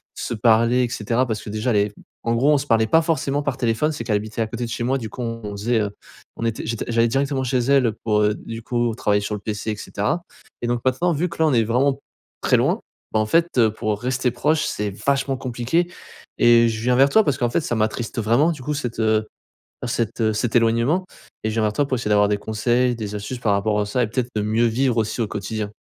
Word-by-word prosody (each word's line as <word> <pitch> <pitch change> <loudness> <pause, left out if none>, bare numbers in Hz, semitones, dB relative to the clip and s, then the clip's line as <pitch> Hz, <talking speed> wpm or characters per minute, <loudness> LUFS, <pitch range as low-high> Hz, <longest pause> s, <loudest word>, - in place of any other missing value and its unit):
se - - -4
parler 115 +2 +3
et 120 - -1
cetera, 115 +4 0
parce 110 -2 -3
que, - - -8
déjà 110 +4 -1
elle - - +1
est 100 0 +1 0.3
en 115 0 +1
gros 140 +6 +3
on - - +4
se 140 - -4
parlait 110 -1 +3
pas 160 +7 +4
forcément 145 -3 0
par 130 - -2
téléphone. 125 +5 +1
C'est - - -5
qu'elle 105 - +1
habitait 110 +2 -7
à 110 - 0
côté 115 +2 -5
de - - -7
chez 120 +1 -3
moi, 135 +3 +1
du 110 -2 -6
coup, 125 - -8
on 115 -3 -4
faisait, 110 +3 0
heu, 105 -1 -2 0.5
on 115 - -3
était 115 -1 -2
j'étais 115 0 -3
j'allais 115 0 +3
directement 135 +1 0
chez 130 0 0
elle, 135 0 +3
heu, 110 - -3
pour, 105 -1 +2
heu 105 0 +3
du 115 0 -8
coup 120 -1 0
travailler 105 -3 +1
sur 105 +1 -3
le 105 - -8
PC 110 0 -3
et - - -3
cetera. 110 +13 -2 0.4
Et 120 - -2
donc, 120 0 0
maintenant, 170 +8 +2
vu 170 +5 0
que - - -10
là, 160 - +4
on 145 - +2
est 115 -2 +4
vraiment 135 +4 +1 0.4
très - - +3
loin, - - +1 0.3
bah, 110 - +3
en 110 - +2
fait, 165 +6 +3
heu, 110 -2 +5
pour 105 -1 -2
rester 125 0 0
proche 150 +5 +1
c'est 105 -1 -2
vachement 135 -1 +1
compliqué 130 +7 -1 0.5
et 115 -1 +5
je 110 0 -4
viens 125 0 +3
vers 135 +1 +6
toi, 220 +6 +5
parce 140 -1 +1
qu'en 120 -1 0
fait, 120 - +1
ça 120 - -2
m'attriste 110 +2 -1
vraiment 120 +10 +3
du 145 - -10
coup 150 - -2
cet, 120 -5 -4
heu 110 -1 +2 0.6
cet, 115 0 -2
heu 110 -1 +2
cet 110 +2 -1
éloignement 120 +11 +2 0.4
et - - +1
je - - -4
viens 110 - +1
vers 105 -1 +1
toi 145 - +1
pour 130 - 0
essayer 105 -2 -3
d'avoir 105 0 +4
des 105 - +1
conseils, 120 +4 +1
des 105 -2 -5
astuces 110 +5 -5
par 105 -4 +1
rapport 105 +1 +1
à 105 - -1
ça 125 +4 0
et - - +2
peut-être 125 +2 -2
de 105 - +1
mieux 110 +3 +2
vivre 120 +1 +1
aussi, 110 +2 -1
au - - 0
quotidien. 105 +1 -4
115 Hz, 260 wpm, -22 LUFS, 110-130 Hz, 0.6 s, vers